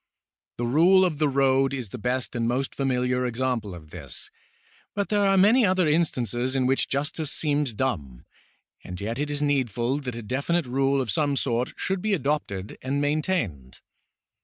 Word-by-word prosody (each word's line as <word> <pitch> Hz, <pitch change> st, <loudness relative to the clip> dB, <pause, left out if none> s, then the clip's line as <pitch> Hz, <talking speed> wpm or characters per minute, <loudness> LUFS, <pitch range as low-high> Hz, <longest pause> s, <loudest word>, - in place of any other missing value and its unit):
The 120 Hz, -, -1 dB
rule 175 Hz, +9 st, +5 dB
of 155 Hz, -5 st, -2 dB
the 150 Hz, -2 st, +3 dB
road 135 Hz, 0 st, +2 dB
i§ 125 Hz, -6 st, -4 dB
the 125 Hz, -, -6 dB
best 125 Hz, +2 st, -2 dB
and 115 Hz, -1 st, 0 dB
most 130 Hz, +3 st, -1 dB
familiar 125 Hz, -2 st, 0 dB
example 120 Hz, -5 st, -2 dB
of 80 Hz, -2 st, -13 dB
this, -, -, -6 dB, 0.6 s
but 200 Hz, -1 st, -1 dB
there 205 Hz, -1 st, +2 dB
are 195 Hz, 0 st, +4 dB
many 220 Hz, +7 st, +6 dB
other 185 Hz, -4 st, +3 dB
instances 130 Hz, -, 0 dB
in 130 Hz, -1 st, +2 dB
which 135 Hz, +1 st, +1 dB
justice 150 Hz, +2 st, -2 dB
seems 145 Hz, -6 st, 0 dB
dumb, 75 Hz, -, -3 dB, 0.6 s
and 90 Hz, 0 st, -7 dB
yet 115 Hz, +5 st, -3 dB
it 145 Hz, 0 st, -1 dB
is 145 Hz, 0 st, -1 dB
needful 130 Hz, -2 st, 0 dB
that 125 Hz, -4 st, -5 dB
a 120 Hz, -, -6 dB
definite 140 Hz, +8 st, 0 dB
rule 135 Hz, +2 st, +1 dB
of 120 Hz, -5 st, -2 dB
some 145 Hz, +1 st, +1 dB
sort 125 Hz, -2 st, -1 dB
should 190 Hz, -1 st, -1 dB
be 215 Hz, 0 st, +1 dB
adopted 130 Hz, -, -3 dB
and 135 Hz, +2 st, -1 dB
maintained. 145 Hz, -, -1 dB
135 Hz, 175 wpm, -25 LUFS, 120-150 Hz, 0.6 s, many